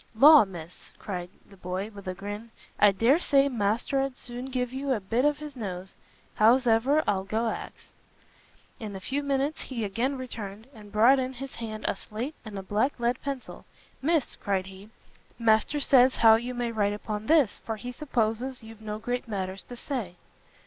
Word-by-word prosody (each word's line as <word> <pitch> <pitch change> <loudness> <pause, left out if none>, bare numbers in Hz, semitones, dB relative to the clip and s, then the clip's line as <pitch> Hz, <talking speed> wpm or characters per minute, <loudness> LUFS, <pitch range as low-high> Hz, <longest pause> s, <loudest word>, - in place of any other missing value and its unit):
"Law, 290 +2 +9
Miss," 175 -3 -10
cried 180 -4 -5 0.2
the 200 - -16
boy, 185 +4 -4
with 200 -2 -11
a 185 - -3
grin, 205 +4 -6 0.3
"I 205 -1 +7
dare 235 - +3
say 280 -5 +4
master'd 250 +4 0
as - - -25
soon 245 +1 -7
give 255 -2 -2
you 275 +1 -2
a 230 - -1
bit 230 +7 0
of 295 0 +3
his 300 -2 -8
nose! 190 -5 -6 0.4
howsever, 245 +5 +4
I'll 190 -2 +1
go 220 +4 -1
ax." - - -9 0.9
In 210 -3 -6
a - - -5
few 270 +9 -2
minutes 280 +2 -1
he 240 -4 -4
again 235 +7 -1
returned, 220 -4 -7
and 210 -3 -13
brought 235 +6 +5
in 260 0 -2
his 270 +1 -7
hand 220 -2 -6
a - - +1
slate 235 +8 -5
and 215 -3 -7
a 195 - -5
black 215 +8 0
lead 240 +2 0
pencil; 275 -2 -6 0.4
"Miss," 310 0 +1
cried 195 -2 -1
he, 190 +2 -12 0.5
"Master 230 +5 +3
says 260 -2 +5
how 225 -1 +7
you 240 +3 0
may 240 -1 -1
write 205 -2 +1
upon 210 +1 -5
this, 295 -9 +4
for 225 - -3
he 245 +3 -6
supposes 250 -2 -2
you've 220 -1 -12
no 210 -1 -4
great 245 +3 -3
matters 195 -2 -3
to 245 - -9
say." 235 -8 -4
230 Hz, 185 wpm, -27 LUFS, 205-265 Hz, 0.9 s, Law